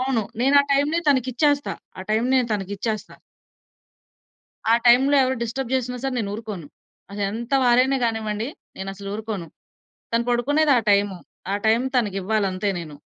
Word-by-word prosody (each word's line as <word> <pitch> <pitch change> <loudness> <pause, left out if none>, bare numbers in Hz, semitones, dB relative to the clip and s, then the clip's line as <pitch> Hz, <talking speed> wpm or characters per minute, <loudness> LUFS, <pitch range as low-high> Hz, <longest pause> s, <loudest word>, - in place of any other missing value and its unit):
అవును. 255 -3 0 0.2
నేను 275 +3 +4
ఆ - - -7
టైమ్‌ని 290 +4 +2
తనకిచ్చేస్తా. 280 +2 +1 0.2
ఆ - - -5
టైమ్‌ని 235 +5 +2
నేను 250 -2 +1
తనకిచ్చేస్తా. 205 +2 -4 1.6
ఆ - - +7
టైంలో 265 +4 +6
ఎవరు 260 0 -1
డిస్టర్బ్ 240 +2 -3
చేసినా 250 -1 -1
సరే 270 -1 -1
నేనూరుకోను. 210 -5 -5 0.5
అదెంత 210 +5 -4
వారైనా 255 +3 +4
గానివ్వండి 220 0 -2 0.3
నేనసలు 195 +1 -6
ఊరుకోను. 215 -5 -5 0.7
తను 235 0 +2
పడుకునేది 290 +5 +2
ఆ - - +2
టైము. 200 -1 +2 0.4
ఆ - - +1
టైం 225 +2 +4
తనకివ్వాలంతే 200 -2 0
నేను. 160 -3 -8
230 Hz, 135 wpm, -23 LUFS, 205-260 Hz, 1.6 s, ఆ